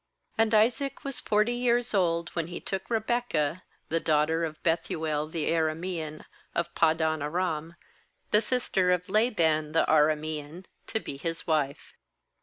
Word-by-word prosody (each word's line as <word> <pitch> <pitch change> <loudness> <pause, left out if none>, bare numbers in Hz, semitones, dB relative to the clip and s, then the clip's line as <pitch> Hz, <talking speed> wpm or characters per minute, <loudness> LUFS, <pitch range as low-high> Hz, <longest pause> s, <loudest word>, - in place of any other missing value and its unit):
20And 225 0 +4
Isaac 240 +6 +2
was 275 -2 -3
forty 215 +3 +2
years 245 -1 +1
old 170 -4 +1
when 165 -2 -3
he 175 - -6
took 190 -1 -4
Rebekah, 220 -9 0 0.3
the 165 - +2
daugh 150 -1 +3
ter 160 +1 -1
of 155 -1 -8
Bethuel 160 -2 0
the 160 -1 -2
Aramean, 160 -1 -2 0.3
of 170 0 -1
Pad 160 -1 +3
dan 160 -1 0
aram, 165 +1 -2 0.6
the 210 - +5
sister 210 -6 +1
of 180 0 +1
Laban 165 -9 +2
the 165 - +4
Aramean, 155 +2 +1 0.2
to 220 - -1
be 140 - -6
his 165 +3 -3
wife. 145 -3 -1
165 Hz, 150 wpm, -28 LUFS, 155-210 Hz, 0.6 s, the